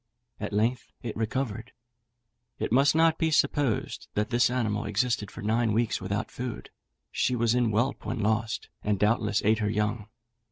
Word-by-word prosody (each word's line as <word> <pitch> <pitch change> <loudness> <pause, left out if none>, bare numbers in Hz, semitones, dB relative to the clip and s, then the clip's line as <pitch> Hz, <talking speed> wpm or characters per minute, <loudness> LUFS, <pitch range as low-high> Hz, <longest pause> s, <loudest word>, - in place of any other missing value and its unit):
At - - -4
length 115 +4 0
it 115 - -4
recovered. 115 0 -3 0.8
It - - -3
must 135 +5 +4
not 165 0 +4
be 160 - +2
supposed 145 -5 0
that 105 0 0
this 120 +1 +4
animal 110 -4 -1
existed 105 0 0
for - - -9
nine 110 +1 +1
weeks 115 0 0
without 100 +3 -3
food; 125 -2 -6 0.4
she 125 - +1
was 120 -1 +2
in 120 -2 +2
whelp 120 +6 0
when 120 +2 -3
lost, 110 +1 -1
and 105 -1 +1
doubtless 105 0 +1
ate 110 +1 +4
her 105 -1 0
young. 105 0 -1
115 Hz, 165 wpm, -28 LUFS, 105-125 Hz, 0.8 s, must